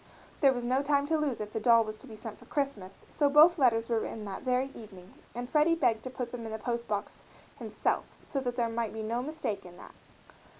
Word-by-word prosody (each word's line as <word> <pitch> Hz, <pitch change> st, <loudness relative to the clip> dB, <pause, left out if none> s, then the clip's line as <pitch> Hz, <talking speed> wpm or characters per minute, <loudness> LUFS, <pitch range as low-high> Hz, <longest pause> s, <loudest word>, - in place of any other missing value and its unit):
There 275 Hz, -2 st, +6 dB
was 245 Hz, -2 st, -3 dB
no 255 Hz, +3 st, +2 dB
time 285 Hz, 0 st, +2 dB
to 320 Hz, +2 st, +1 dB
lose 285 Hz, -5 st, -1 dB
if 210 Hz, 0 st, -5 dB
the 220 Hz, -, -1 dB
doll 230 Hz, +1 st, +5 dB
was 215 Hz, 0 st, -7 dB
to 270 Hz, -, -13 dB
be 220 Hz, -, -9 dB
sent 220 Hz, 0 st, -8 dB
for -, -, -16 dB
Christmas, 220 Hz, -10 st, -4 dB
so 290 Hz, -2 st, +2 dB
both 310 Hz, +4 st, +7 dB
letters 230 Hz, -4 st, +3 dB
were 230 Hz, -2 st, +1 dB
written 220 Hz, 0 st, -5 dB
that 195 Hz, -1 st, -6 dB
very 255 Hz, +1 st, 0 dB
evening 190 Hz, -5 st, -12 dB, 0.2 s
and 245 Hz, 0 st, -4 dB
Freddie 305 Hz, +4 st, +3 dB
begged 240 Hz, -8 st, +1 dB
to -, -, -3 dB
put 250 Hz, -2 st, -5 dB
them 245 Hz, -2 st, -6 dB
in 225 Hz, -, -6 dB
the 220 Hz, -, -3 dB
post 235 Hz, +1 st, -3 dB
box 205 Hz, -1 st, -3 dB, 0.4 s
himself -, -, -1 dB, 0.3 s
that 260 Hz, -3 st, -1 dB
there 235 Hz, -2 st, +1 dB
might 230 Hz, -1 st, -2 dB
be 220 Hz, 0 st, -5 dB
no 230 Hz, +3 st, -1 dB
mistake 260 Hz, -8 st, -4 dB
in 175 Hz, -1 st, -13 dB
that. -, -, -12 dB
240 Hz, 240 wpm, -30 LUFS, 220-275 Hz, 0.4 s, both